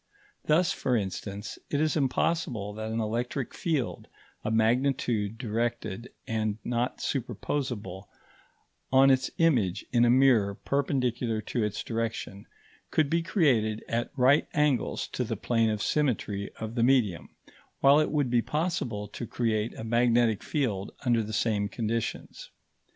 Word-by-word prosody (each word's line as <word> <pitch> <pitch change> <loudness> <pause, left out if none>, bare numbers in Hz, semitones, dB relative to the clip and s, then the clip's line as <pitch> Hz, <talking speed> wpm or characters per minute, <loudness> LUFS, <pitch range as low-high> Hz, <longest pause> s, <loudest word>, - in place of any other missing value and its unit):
Thus, 170 +3 +3
for 125 - 0
instance, 100 0 -4
it 145 - 0
is 155 0 +1
impossible 130 -7 0
that 110 +1 -5
an 110 +1 -2
electric 120 +4 -2
field, 155 -8 -2 0.4
a - - -1
magnitude 115 -1 +1
directed 115 -1 -3
and 110 -2 -1
not 120 +1 -1
superposable 120 -5 -3 0.8
on 135 +1 +6
its 130 0 +2
image 115 - +2
in 120 -1 +4
a 120 - +5
mirror 120 -6 +4
perpendicular 125 -1 -1
to 110 +2 -2
its 105 0 -2
direction, 115 -3 -4 0.4
could 150 -3 +1
be 170 +1 +2
created 125 - +1
at 115 +1 -1
right 135 +4 +4
angles 150 -6 +1
to - - -2
the - - -3
plane 115 -2 +1
of 105 -1 -1
symmetry 110 -9 0
of 110 0 -5
the 120 - -1
medium; 115 -8 +2 0.5
while 140 +2 +7
it 155 - +2
would 145 -5 0
be 120 -1 +4
possible 145 - -2
to 115 +3 -6
create 110 -1 -1
a - - -7
magnetic 115 -1 +2
field 110 -10 -2
under 120 -2 +3
the 110 0 -5
same 105 -2 0
conditions. 115 0 -4
120 Hz, 140 wpm, -28 LUFS, 110-135 Hz, 0.8 s, while